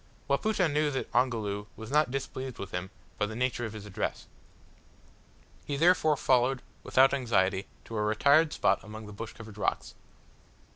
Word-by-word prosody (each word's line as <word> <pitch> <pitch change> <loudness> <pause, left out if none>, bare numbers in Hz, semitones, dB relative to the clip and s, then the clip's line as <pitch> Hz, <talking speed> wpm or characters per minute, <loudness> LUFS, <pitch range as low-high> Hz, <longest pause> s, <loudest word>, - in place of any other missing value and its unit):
Wapoota 185 +6 +2
knew 150 0 +1
that 135 -2 -4
Ongoloo 110 -5 0
was 110 +1 -9
not 150 -2 +3
displeased 130 -1 -4
with 100 -1 -7
him 90 +1 -4 0.3
by 105 - +1
the 110 - -7
nature 125 0 -1
of 110 - -6
his 105 -2 -8
address. 100 -2 -3 1.4
He 145 - -3
therefore 160 -2 +4
followed, 130 0 +2 0.2
without 135 +1 +4
anxiety, 100 -7 +1 0.2
to 115 - -7
a 105 - 0
retired 140 +9 +4
spot 95 - +1
among 110 0 -9
the 105 - -9
bush 110 +3 -7
covered 110 -2 -11
rocks. - - -1
120 Hz, 160 wpm, -29 LUFS, 105-140 Hz, 1.4 s, therefore